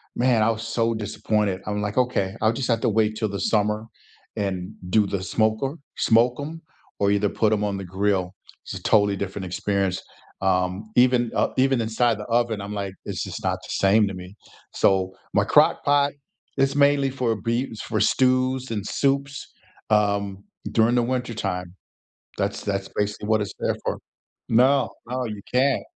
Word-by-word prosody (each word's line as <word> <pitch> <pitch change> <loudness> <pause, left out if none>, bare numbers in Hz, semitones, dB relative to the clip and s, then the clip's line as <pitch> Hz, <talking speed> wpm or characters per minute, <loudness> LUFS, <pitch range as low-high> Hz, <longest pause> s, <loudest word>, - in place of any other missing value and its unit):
man, 120 -3 +3
I 110 - +3
was 115 0 -2
so 115 0 0
disappointed, 105 -2 -1
I'm, 105 0 -1
like, 105 +2 -3
"Okay, 110 -6 0
I'll 110 +1 +3
just 125 +1 -2
have 115 -1 +2
to - - +2
wait 110 0 +1
till 110 0 -1
the 100 -1 -4
summer 105 +1 +1 0.5
and 95 -3 -3 0.2
do 105 +1 +4
the 95 -1 -2
smoker, 110 - 0 0.2
smoke 120 +3 +3
'em, 155 +3 -6 0.4
or 100 0 +3
either 100 0 +2
put 110 +1 +1
'em 105 -1 0
on 100 -1 -1
the 95 - -5
grill." 95 0 0 0.3
It's - - -7
a - - -7
totally 100 -2 +3
different 95 0 -4
experience. 95 +1 -1 0.4
Um, 95 +2 0
even, 125 -1 +4
uh, - - +2
even 130 -1 +3
inside 115 0 +1
the - - -5
oven, 115 -3 0
I'm 100 +1 -6
like, 100 -2 -4
it's - - -4
just - - -6
not - - 0
the - - -11
same 105 +2 +3
to 100 - -4
me. 90 +2 -10 0.4
So, 95 -1 +2 0.2
my - - +4
crock - - +4
pot 145 0 +3 0.4
is 135 +1 +2
mainly 140 -1 +4
for 125 -4 0
bee 115 +5 0
is 110 - -7
for 110 -2 -2
stews 130 0 +2
and 105 -3 -2
soups, 140 +3 -1 0.4
um, 100 -2 +1 0.3
during 115 +2 +3
the 120 - +3
wintertime. 115 -8 -3 0.6
That's - - -1
that's 100 -1 -2
basically 105 0 -2
what 110 -1 +3
it's 100 - -5
there - - 0
for. - - -2 0.5
No, 130 +4 +4 0.2
no, 125 +1 -2
you 105 -2 -6
can't. 135 +2 +3
110 Hz, 180 wpm, -24 LUFS, 100-125 Hz, 0.6 s, do